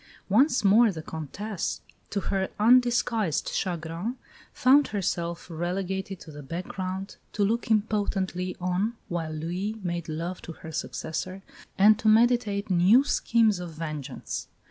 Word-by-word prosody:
Once 250 Hz, +4 st, +4 dB
more 215 Hz, +3 st, +6 dB
the 160 Hz, -4 st, -7 dB
Comtesse, 170 Hz, +6 st, -4 dB, 0.3 s
to 200 Hz, -, -2 dB
her 190 Hz, -1 st, -1 dB
undisguised 235 Hz, -, +3 dB
chagrin, 175 Hz, +5 st, -3 dB, 0.4 s
found 275 Hz, +3 st, +5 dB
herself 170 Hz, -4 st, -2 dB
relegated 185 Hz, +3 st, -3 dB
to 155 Hz, -, -11 dB
the 150 Hz, 0 st, -9 dB
background, 185 Hz, +5 st, -5 dB, 0.2 s
to 205 Hz, -, +1 dB
look 225 Hz, +4 st, 0 dB
impotently 200 Hz, -4 st, 0 dB
on 185 Hz, +5 st, 0 dB, 0.2 s
while 165 Hz, -2 st, -2 dB
Louis 175 Hz, +7 st, -3 dB
made 170 Hz, -2 st, -3 dB
love 170 Hz, +4 st, -4 dB
to 165 Hz, -, -8 dB
her 160 Hz, -, -10 dB
successor, 185 Hz, +4 st, -4 dB, 0.3 s
and 210 Hz, +2 st, +6 dB
to 220 Hz, -, -1 dB
meditate 220 Hz, -3 st, +3 dB
new 185 Hz, +9 st, +6 dB
schemes 225 Hz, -7 st, +2 dB
of 175 Hz, -2 st, -6 dB
vengeance. 155 Hz, -4 st, -5 dB
190 Hz, 130 wpm, -27 LUFS, 170-215 Hz, 0.4 s, more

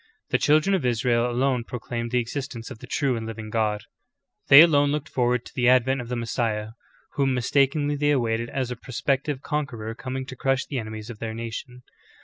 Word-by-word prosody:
The -, -, +3 dB
children 155 Hz, +6 st, +3 dB
of 190 Hz, -, +1 dB
Israel 120 Hz, 0 st, +1 dB
alone 125 Hz, 0 st, +1 dB
proclaimed 120 Hz, 0 st, -5 dB
the 125 Hz, -, 0 dB
existence 125 Hz, 0 st, -4 dB
of 120 Hz, -, -9 dB
the -, -, -11 dB
true 140 Hz, -4 st, 0 dB
and 110 Hz, -1 st, -4 dB
living 110 Hz, -1 st, -7 dB
God; 105 Hz, -2 st, 0 dB, 0.6 s
they 140 Hz, +2 st, +11 dB
alone 145 Hz, -4 st, +5 dB
looked 150 Hz, +1 st, -2 dB
forward 125 Hz, -1 st, 0 dB
to -, -, -12 dB
the 125 Hz, -1 st, +3 dB
advent 130 Hz, +1 st, +3 dB
of 120 Hz, -, -9 dB
the 125 Hz, -, -2 dB
Messiah, 110 Hz, -2 st, -2 dB, 0.5 s
whom 135 Hz, -2 st, +2 dB
mistakenly 140 Hz, +4 st, +1 dB
they 145 Hz, +1 st, +1 dB
awaited 120 Hz, -4 st, 0 dB
as 130 Hz, -2 st, -2 dB
a -, -, -3 dB
prospective 135 Hz, +3 st, -2 dB
conqueror 135 Hz, -8 st, -3 dB
coming 130 Hz, +3 st, -5 dB
to 130 Hz, -, -8 dB
crush 135 Hz, +1 st, 0 dB
the 135 Hz, -, -3 dB
enemies 110 Hz, 0 st, -7 dB
of 110 Hz, -, -11 dB
their 110 Hz, -1 st, -4 dB
nation. 115 Hz, +2 st, -7 dB
125 Hz, 195 wpm, -25 LUFS, 115-135 Hz, 0.6 s, they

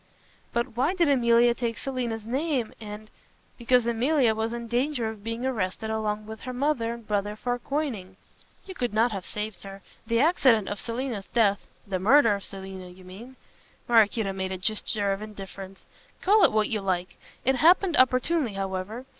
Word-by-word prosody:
"But 235 Hz, -1 st, -2 dB
why 280 Hz, +10 st, +1 dB
did 345 Hz, -3 st, +3 dB
Emilia 240 Hz, -2 st, +4 dB
take 235 Hz, -2 st, -3 dB
Selina's 240 Hz, -5 st, -3 dB
name 265 Hz, -1 st, -1 dB
and 215 Hz, 0 st, -9 dB, 0.2 s
" -, -, -37 dB
"Because 245 Hz, 0 st, +3 dB
Emilia 240 Hz, +1 st, +2 dB
was 220 Hz, +1 st, -2 dB
in 235 Hz, 0 st, -5 dB
danger 245 Hz, 0 st, 0 dB
of 215 Hz, -2 st, -9 dB
being 230 Hz, +2 st, -4 dB
arrested 220 Hz, -3 st, -2 dB
along 215 Hz, -1 st, -2 dB
with 220 Hz, 0 st, -9 dB
her 255 Hz, -, -6 dB
mother 250 Hz, -3 st, 0 dB
and 235 Hz, -2 st, -14 dB
brother 205 Hz, 0 st, -1 dB
for 245 Hz, +2 st, -2 dB
coining. 235 Hz, -10 st, -3 dB, 0.5 s
You 380 Hz, -, -8 dB
could 245 Hz, -, -3 dB
not 230 Hz, +2 st, +3 dB
have 195 Hz, -3 st, -5 dB
saved 210 Hz, 0 st, -5 dB
her. 195 Hz, -1 st, -10 dB, 0.2 s
The 230 Hz, 0 st, +2 dB
accident 260 Hz, -, +4 dB
of 205 Hz, -, -4 dB
Selina's 235 Hz, -3 st, -4 dB
death 205 Hz, -4 st, +1 dB
" -, -, -35 dB
"The 190 Hz, -2 st, -2 dB
murder 230 Hz, +3 st, +5 dB
of 200 Hz, -1 st, -4 dB
Selina, 190 Hz, -1 st, -8 dB
you 180 Hz, +1 st, -14 dB
mean." 210 Hz, +8 st, -11 dB, 0.5 s
Maraquito 220 Hz, -3 st, +3 dB
made 190 Hz, 0 st, -3 dB
a 190 Hz, -, -3 dB
gesture 205 Hz, +1 st, -1 dB
of 195 Hz, -, -6 dB
indifference. 195 Hz, -2 st, -9 dB, 0.3 s
"Call 410 Hz, +2 st, +4 dB
it -, -, +6 dB
what 215 Hz, -1 st, +1 dB
you 215 Hz, -2 st, -1 dB
like. 185 Hz, -2 st, -2 dB, 0.3 s
It 265 Hz, +1 st, +3 dB
happened 345 Hz, +3 st, +4 dB
opportunely 255 Hz, 0 st, +2 dB
however. 195 Hz, +5 st, -4 dB
225 Hz, 180 wpm, -26 LUFS, 200-250 Hz, 0.5 s, it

